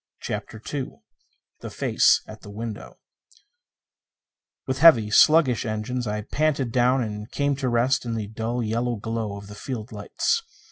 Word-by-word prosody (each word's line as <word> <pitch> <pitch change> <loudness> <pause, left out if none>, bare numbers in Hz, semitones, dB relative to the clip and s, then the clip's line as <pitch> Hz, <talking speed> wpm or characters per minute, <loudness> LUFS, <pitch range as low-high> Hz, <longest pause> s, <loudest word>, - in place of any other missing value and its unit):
CHAPTER 110 - -5
II 135 -3 -3 0.7
The - - -7
Face - - +3
at 110 0 -12
the 100 - -12
Window 110 +1 -7 1.7
With 130 0 -2
heavy, 120 -10 +6
sluggish 150 -1 +5
engines 115 +2 -3
I 105 0 -2
panted 140 0 -1
down 125 +1 +2
and 105 -1 -6
came 140 -1 0
to 130 -2 -1
rest 125 +3 +2
in 115 -2 -3
the 110 -2 -3
dull 115 +3 -3
yellow 120 +2 -1
glow 110 -1 -4
of 100 - -10
the 105 - -11
field 115 0 -6
lights. 465 - -1
115 Hz, 150 wpm, -24 LUFS, 110-130 Hz, 1.7 s, heavy